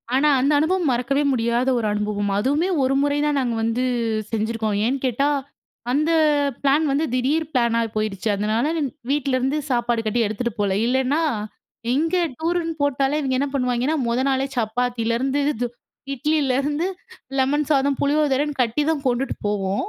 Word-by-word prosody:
ஆனா 295 +3 +4
அந்த 275 +3 +2
அனுபவம் 340 -1 +1
மறக்கவே 270 +4 0
முடியாத 235 +1 0
ஒரு 220 -2 0
அனுபவம். 210 -1 -1
அதுவுமே 290 - +1
ஒரு 260 +1 +2
முறைதான் 290 0 +1
நாங்க 245 -3 -1
வந்து 230 +3 0 0.5
செஞ்சிருக்கோம். 220 -1 -1
ஏன்னு 260 +4 +1
கேட்டா, 260 +3 +1 0.6
அந்த 305 +5 +2 0.5
பிளான் 285 +3 +3
வந்து 290 +4 +1
திடீர் 285 +5 0
பிளானா 235 -2 +2
போயிடுச்சு. 215 -1 -2
அதனால 215 +5 0 0.4
வீட்லருந்து 275 0 0
சாப்பாடு 240 -1 +1
கட்டி 235 +2 +1
எடுத்துட்டு 220 +2 -3
போகல. 195 -2 +1
இல்லைன்னா 265 +5 +1 0.7
இங்க 325 +5 +1 0.2
டூருன்னு 330 0 -1
போட்டாலே, 280 +1 +1
இவைங்க 265 -3 -1
என்ன 285 - 0
பண்ணுவேங்கன்னா, 250 +2 0
முத 235 +2 +1
நாளே 270 0 +1
சப்பாத்திலேருந்து, 240 +3 0
இது 245 -1 -2 0.5
இட்லிலேருந்து, 290 +2 0 0.5
லெமன் 290 +3 +2
சாதம், 280 -2 +2
புளியோதரைன்னு 290 0 +1
கட்டி 240 +5 +1
தான் 305 -4 -1
கொண்டுட்டு 255 +2 0
போவோம். 200 - -1
260 Hz, 140 wpm, -22 LUFS, 235-290 Hz, 0.7 s, ஆனா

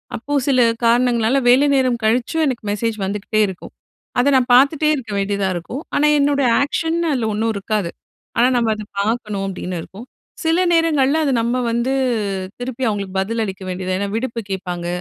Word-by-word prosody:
அப்போ 285 +6 -5
சில 265 -2 +3 0.3
காரணங்களால 240 +1 +3
வேலை 270 +4 +5
நேரம் 255 -3 +1
கழிச்சும் 245 +8 +1
எனக்கு 255 -4 -3
மெசேஜ் 220 +1 -2
வந்துக்கிட்டே 210 +2 -1
இருக்கும். 190 -2 -9 0.5
அத 260 +3 +3
நான் 255 -1 +2
பார்த்துட்டே 285 +4 +4
இருக்க 230 -7 -7
வேண்டியதா 200 0 -1
இருக்கும். 235 - -5
ஆனா 300 - +3
என்னோட 280 0 +2 0.2
ஆக்க்ஷன் 325 +4 -1
அதுல 245 -5 0
ஒண்ணும் 225 +2 0
இருக்காது. 200 -2 -2 0.5
ஆனா 240 - +5
நம்ம 230 -2 +1
அத 215 - -7 0.2
பாக்கணும் 210 -2 -2
அப்டின்னு 185 -2 -5
இருக்கும். 215 +6 -11 0.4
சில 330 +3 +3
நேரங்கள்ல 315 -3 +3
அது 275 - +1
நம்ம 235 +2 0 0.2
வந்து, 235 +3 0 0.7
திருப்பி 255 +1 -5
அவுங்களுக்கு 200 -2 -4
பதில் 225 +3 -2
அளிக்க 190 -1 -7
வேண்டியதா 185 0 -3
ஏன்னா 200 - -1
விடுப்பு 230 0 -3
கேப்பாங்க, 180 -2 -4
230 Hz, 165 wpm, -19 LUFS, 200-265 Hz, 0.7 s, வேலை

